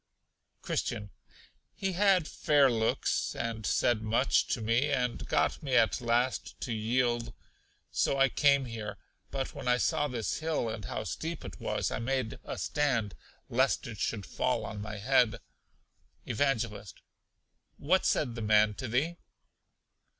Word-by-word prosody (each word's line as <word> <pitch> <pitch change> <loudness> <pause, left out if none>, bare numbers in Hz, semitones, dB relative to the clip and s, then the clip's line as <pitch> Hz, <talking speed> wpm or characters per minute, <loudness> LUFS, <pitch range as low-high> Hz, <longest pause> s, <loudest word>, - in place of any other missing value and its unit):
Christian. 105 -1 -2 0.6
He 195 -1 -1
had 185 -3 +3
fair 145 -4 +3
looks, 110 -1 0
and 115 -2 -3
said 120 -3 +2
much 115 +4 +2
to - - -1
me, 115 +6 +1
and 125 -4 -1
got - - +1
me 135 -5 -1
at 115 -3 +3
last 120 +2 0
to 120 - -2
yield; 120 +2 0 0.6
so 135 - +1
I 135 0 +5
came 140 -1 +3
here. 110 -3 -6 0.3
But 135 -1 -3
when - - -7
I 125 0 +4
saw 145 +3 +1
this 120 -5 -2
hill, 160 -6 -1
and 110 -2 -5
how - - -3
steep 165 +1 -5
it - - -8
was, - - -1
I - - -2
made 125 -1 -2
a - - -5
stand, 125 -9 0 0.3
lest 130 +3 +1
it 115 -4 -7
should 105 -4 -2
fall 125 +6 -1
on 105 -1 -6
my 105 0 -5
head. 125 0 +3 0.9
Evangelist. 115 -5 -1 0.8
What 180 +6 +2
said 125 -6 +1
the 115 - -6
man 105 0 +4
to 130 - -5
thee? 145 +9 0
120 Hz, 150 wpm, -30 LUFS, 110-140 Hz, 0.9 s, I